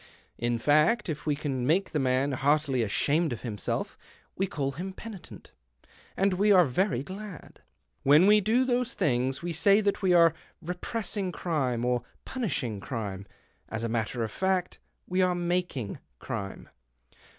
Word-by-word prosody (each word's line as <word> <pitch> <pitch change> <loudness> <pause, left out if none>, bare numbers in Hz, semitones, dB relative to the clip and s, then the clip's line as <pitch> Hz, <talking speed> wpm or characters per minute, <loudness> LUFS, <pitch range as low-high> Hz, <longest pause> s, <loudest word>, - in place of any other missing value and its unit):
In 120 0 0
fact, 155 - +3
if 155 0 -5
we 150 - +2
can 135 -4 -2
make 185 +6 +2
the 150 - 0
man 130 +1 +1
heartily 140 0 +1
ashamed 145 +9 +1
of 120 - -5
himself, 105 -5 -3 0.4
we 195 - 0
call 140 -5 -2
him 185 +8 -6
penitent, 210 -2 -10 0.7
and 195 0 +2
we 205 +3 +3
are 185 -3 +7
very 135 -1 0
glad. 190 0 -9 0.4
When 150 +6 +6
we 210 +1 +6
do 230 +6 +2
these 250 -1 0
things 130 +1 0
we 175 -1 -2
say 200 +6 +4
that 205 -1 0
we 190 -2 +2
are 170 -3 +6 0.3
repress 180 +7 -4
ing 190 -3 -1
crime 135 -10 -1
or 125 -1 +1 0.2
punishing 135 - -2
crime 100 -4 -5 0.2
— - - -39
as 110 0 -4
a 115 - -1
matter 115 +1 -1
of 110 - -4
fact, 190 +2 -1 0.3
we 185 +1 0
are 180 -1 +2
making 175 - -2 0.2
crime. 100 0 -6
155 Hz, 160 wpm, -28 LUFS, 125-190 Hz, 0.7 s, are